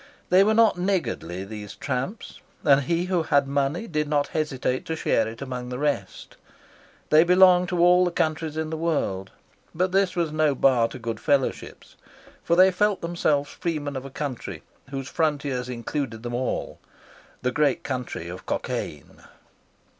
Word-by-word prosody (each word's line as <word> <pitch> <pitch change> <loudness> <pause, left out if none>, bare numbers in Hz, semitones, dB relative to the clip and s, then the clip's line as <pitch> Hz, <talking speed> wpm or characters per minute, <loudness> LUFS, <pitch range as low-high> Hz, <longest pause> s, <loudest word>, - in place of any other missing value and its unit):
They 185 +2 +7
were 215 +2 +2
not 225 -5 +4
niggardly, 170 - -2
these 105 -1 -8
tramps, 140 - -4 0.2
and 140 -2 +5
he 170 +5 0
who 180 -2 +1
had 140 -3 +2
money 140 +7 -1
did 150 -7 -2
not 145 -1 0
hesitate 135 -4 -1
to 160 - -2
share 115 -7 +1
it 115 +4 -7
among 125 -2 -5
the 125 - -4
rest. 140 -9 -3 0.7
They 155 +1 +7
belonged 180 0 +5
to 180 - -1
all 180 +1 +5
the 180 - +2
countries 155 -2 -1
in 160 0 -2
the 160 - -3
world, 140 - -1 0.5
but 180 +2 +1
this 195 -1 +2
was 170 -3 0
no 155 -2 +2
bar 125 -3 +4
to 115 - -9
good 115 -2 -4
fellowship; 140 -2 -1 0.6
for 170 - +2
they 185 +2 +6
felt 205 +2 +1
themselves 155 -4 0
freemen 150 -4 -3
of 130 - -4
a 135 - -8
country 120 - -5 0.3
whose 135 -1 -5
frontiers 140 -5 -1
include 120 -1 -4
them 120 0 -4
all, 125 +2 -3 0.6
the 125 - +1
great 145 0 +1
country 125 -10 -4
of 90 +1 -9
Cockaine. 75 -3 -4
145 Hz, 165 wpm, -25 LUFS, 125-170 Hz, 0.7 s, They